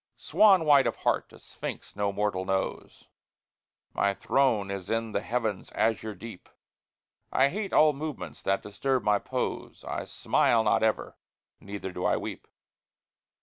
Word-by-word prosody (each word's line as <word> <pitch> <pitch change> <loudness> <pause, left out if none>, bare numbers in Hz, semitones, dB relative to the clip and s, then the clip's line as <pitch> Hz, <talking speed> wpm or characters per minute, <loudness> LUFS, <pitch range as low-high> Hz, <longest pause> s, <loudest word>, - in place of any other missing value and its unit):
Swan 195 -6 +4
white 145 -3 +6
of - - -1
heart, - - -1
a - - -14
sphinx - - -8
no 100 0 0
mortal 100 -2 -1
knows, 95 0 -3 0.9
My 100 0 +1
throne 110 -8 +1
is 100 -1 -5
in 115 0 -1
the 100 - -1
heaven's 110 -5 -2
azure 110 0 0
deep; 110 -1 -10 0.8
I 140 - +4
hate 200 +4 -4
all 155 0 +5
movements 150 +1 -6
that 95 0 0
disturb 125 +5 -1
my 105 -1 +3
pose, - - -4
I - - -4
smile 115 -2 +2
not 105 - +2
ever, 110 -1 0 0.4
neither 100 -1 -6
do 90 0 -5
I - - +2
weep. - - -6
110 Hz, 145 wpm, -28 LUFS, 100-135 Hz, 0.9 s, white